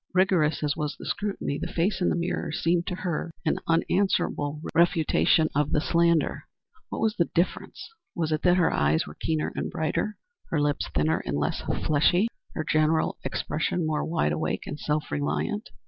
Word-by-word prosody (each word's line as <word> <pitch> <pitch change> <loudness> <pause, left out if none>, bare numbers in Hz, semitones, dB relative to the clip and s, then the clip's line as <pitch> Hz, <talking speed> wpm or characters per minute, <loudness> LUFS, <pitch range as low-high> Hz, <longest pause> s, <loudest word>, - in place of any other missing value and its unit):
Rigorous 175 -5 +3
as 145 -1 +1
was 150 -1 -3
the - - -9
scrutiny, 200 -8 -2
the - - -4
face 185 +4 0
in 175 - +3
the - - +1
mirror 170 -1 -2
seemed 170 +2 +1
to 180 - -2
her 175 -2 -3 0.2
an 155 - +1
unanswerable 165 -4 +1
refutation 165 -1 +3
of 150 +1 +1
the - - +4
slander. 170 0 +2 0.4
What - - -4
was 220 -1 +1
the 170 - +2
difference? 170 +2 -1 0.3
Was 160 -3 -1
it 155 - 0
that 180 0 +4
her 175 - +3
eyes 75 +2 +2
were 75 - -9
keener 155 - -2
and - - -2
brighter, 160 +7 -2 0.3
her 160 - 0
lips 145 -1 0
thinner 75 +1 +1
and - - -2
less - - -1 0.2
fleshly, 175 +8 +3 0.3
her 155 - -1
general 155 +1 +2
expression 165 +2 -1
more 155 -1 0
wide 160 - 0
awake 75 - -2
and 150 - -6
self 150 0 -2
reliant? 205 +8 -2
160 Hz, 180 wpm, -26 LUFS, 150-175 Hz, 0.4 s, the